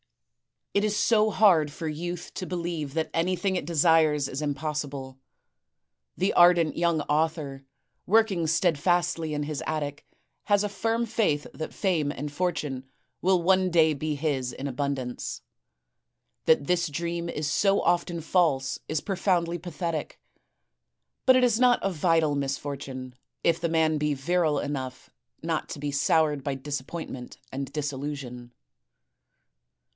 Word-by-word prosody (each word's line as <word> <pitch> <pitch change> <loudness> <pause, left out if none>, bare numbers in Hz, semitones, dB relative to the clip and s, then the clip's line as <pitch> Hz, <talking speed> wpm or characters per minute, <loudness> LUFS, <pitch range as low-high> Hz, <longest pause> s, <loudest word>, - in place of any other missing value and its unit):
It 200 - +2
is 210 -1 +1
so 215 0 +3
hard 185 -8 +4
for 160 +3 -6
youth 175 +3 -5
to 185 - -4
believe 170 -5 -3
that 160 -1 -1
anything 185 +3 0
it 180 - -2
desires 160 -3 +3
is 135 +2 -5
impossible. 145 -2 -4 1.0
The 190 +2 +1
ardent 175 -2 +5
young 170 -2 +1
author, 150 -2 -1 0.4
working 200 -5 +3
steadfastly 170 0 +1
in 145 - -1
his 145 -1 -4
attic, 145 -2 -3 0.4
has 205 -1 +3
a 210 - -1
firm 225 +4 0
faith 205 -10 0
that 155 - -6
fame 170 -7 0
and 145 0 -5
fortune 145 -5 -2 0.4
will 185 -1 +3
one 185 +1 +3
day 160 -2 +4
be 150 +1 -2
his 140 -4 -1
in 135 - -6
abundance. 135 -2 -3 1.0
That 160 -3 +4
this 175 +1 +1
dream 170 +3 -3
is 150 -2 -2
so 195 +3 +3
often 175 -1 +1
false 155 -6 +1
is 155 -1 -1
profoundly 175 -3 0
pathetic; 165 -2 -4 1.1
but 260 - +8
it 255 - +4
is 235 -2 +3
not 250 -1 +5
a 195 - +1
vital 165 -2 +2
misfortune 135 -2 -4 0.3
if 170 -1 +3
the 170 0 -1
man 160 -1 +2
be 150 -1 0
virile 155 +2 +1
enough 130 -3 -4 0.3
not 165 -1 -2
to - - -6
be 145 0 -2
soured 150 0 +2
by 140 -1 -2
disappointment 135 -1 -6
and 135 0 -4
disillusion. 135 -4 -5
160 Hz, 140 wpm, -27 LUFS, 145-175 Hz, 1.1 s, but